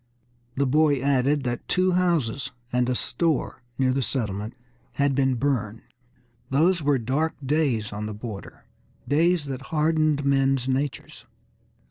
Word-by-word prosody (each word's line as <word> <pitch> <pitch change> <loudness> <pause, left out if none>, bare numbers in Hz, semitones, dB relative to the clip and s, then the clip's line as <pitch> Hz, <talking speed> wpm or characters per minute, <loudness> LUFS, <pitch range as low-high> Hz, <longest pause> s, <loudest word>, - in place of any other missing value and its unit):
The 140 - +1
boy 145 +1 +3
added 140 +1 +2
that 120 -1 -3
two 185 0 +2
houses 155 -9 +1 0.2
and 125 0 +2
a 125 - +1
store 155 +6 -1 0.2
near 130 -1 +2
the 135 - 0
settlement 110 -4 -3 0.4
had 140 -1 +1
been 135 -1 +2
burned. 115 -4 -1 0.7
Those 165 +6 +3
were 145 -1 +2
dark 135 +7 -1
days 130 -8 0
on 105 +1 -4
the 110 - -5
border, 105 -2 -8 0.4
days 165 +2 +2
that 135 -2 -5
hardened 155 -2 +1
men's 135 -2 +2
natures. 135 +2 -3
135 Hz, 135 wpm, -25 LUFS, 125-150 Hz, 0.7 s, boy